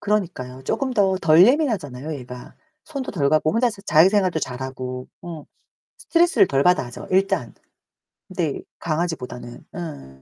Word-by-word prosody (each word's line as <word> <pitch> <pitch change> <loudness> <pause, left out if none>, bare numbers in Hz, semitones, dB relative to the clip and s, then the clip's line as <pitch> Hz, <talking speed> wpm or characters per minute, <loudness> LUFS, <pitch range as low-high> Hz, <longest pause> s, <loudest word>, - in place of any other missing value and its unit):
그러니까요. 165 -12 -2
조금 260 - -1
더 195 -4 +3
덜 165 +3 +7
예민하잖아요, 190 - 0
얘가. 125 -2 -10 0.3
손도 275 -4 -5
덜 140 -7 +1
가고 155 +1 +2
혼자서 230 -3 0
자기 165 +4 +6
생활도 190 -5 +1
잘하고. 130 -1 -5
어. 165 -4 -8 0.6
스트레스를 335 - +3
덜 135 -3 +1
받아 180 -5 +3
하죠, 120 - -9
일단. 190 - +1 0.8
네. 170 -6 -2 0.2
강아지보다는 155 -7 -3 0.2
어. 145 - -8
165 Hz, 315 characters per minute, -22 LUFS, 130-195 Hz, 0.8 s, 덜